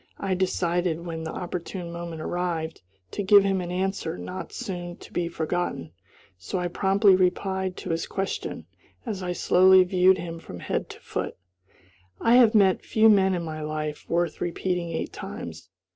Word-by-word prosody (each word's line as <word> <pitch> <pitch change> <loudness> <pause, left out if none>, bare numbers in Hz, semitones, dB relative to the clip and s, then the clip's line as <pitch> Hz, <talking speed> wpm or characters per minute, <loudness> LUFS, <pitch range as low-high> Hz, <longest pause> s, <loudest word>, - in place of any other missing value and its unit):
I 195 -1 -1
decided, 175 -2 0
when 165 -1 -5
the 160 - -4
opportune 175 0 -5
moment 170 -2 -6
arrived, 170 -2 -2 0.3
to - - -3
give 200 0 +7
him 195 -1 +1
an 175 - -5
answer 180 -2 -2
not 185 +1 -6
soon 175 -2 -5
to - - -14
be 175 -1 0
forgotten; 165 - -2 0.5
so 95 - -4
I 180 -1 -1
promptly 195 +2 +4
replied 190 0 0
to - - -5
his 165 0 -1
question, 195 0 -4 0.4
as 210 -5 -4
I 180 -1 -2
slowly 185 +1 +6
viewed 185 +1 +4
him 165 -1 -6
from 90 - -9
head - - -3
to - - -10
foot, - - -4 0.8
"I 230 - +3
have 235 -3 +6
met 195 -3 +4
few 220 0 +4
men, 190 -3 +4
in 175 - -3
my 155 -1 -5
life, 155 0 -4
worth 170 0 0
repeating 175 0 -1
eight 165 - -4
times." 90 - -8
180 Hz, 170 wpm, -26 LUFS, 170-190 Hz, 0.8 s, give